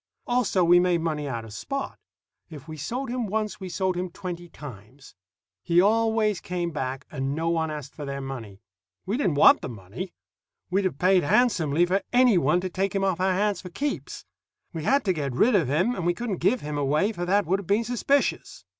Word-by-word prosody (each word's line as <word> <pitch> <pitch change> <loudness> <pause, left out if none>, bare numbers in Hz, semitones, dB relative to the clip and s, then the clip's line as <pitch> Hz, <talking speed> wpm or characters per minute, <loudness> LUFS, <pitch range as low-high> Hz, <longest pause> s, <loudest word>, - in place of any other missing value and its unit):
Also, 240 -7 +1
we 175 +1 +6
made 175 -1 +2
money 155 -3 -2
out 115 -4 -4
of 110 - -11
Spot. 275 - -4 0.5
If 150 -2 -11
we 155 - -7
sold 240 - -4
him 245 -3 -2
once, 215 +1 -2
we 190 -2 -6
sold 185 +1 -1
him 180 +1 -3
twenty 175 -1 -7
times. 130 -2 -12 0.5
He 175 -1 +3
always 220 0 +2
came 175 -1 -3
back, 135 -2 -4
and 135 -1 -2
no 165 +1 -1
one 165 -1 0
asked 150 -3 -7
for 150 - -8
their 140 -1 -4
money. 120 -8 -7 0.4
We 200 +4 -1
didn't 195 - +1
want 145 - +7
the - - -5
money. 115 - -7 0.6
We'd 195 +1 +1
have 175 -7 -1
paid 185 +2 +4
handsomely 170 - +3
for 190 +3 +1
any 245 -6 +5
one 165 +4 +2
to 185 - -3
take 195 +2 -1
him 195 - +1
off 190 -3 0
our 185 0 +2
hands 200 0 0
for 180 - -9
keeps. 280 +11 -4 0.5
We 160 -2 -5
had 275 -2 +2
to 190 - +2
get 140 -5 -3
rid 235 - +4
of 185 -9 +3
him, 175 - +1
and 185 - -4
we 175 +1 +1
couldn't 225 -4 -3
give 250 +8 +1
him 150 0 -4
away, 150 +9 +1
for 175 -5 -5
that 200 +2 +2
would 190 +4 +1
have 195 - -9
been 205 +3 +2
suspicious. 250 +4 -1
175 Hz, 215 wpm, -26 LUFS, 150-205 Hz, 0.6 s, want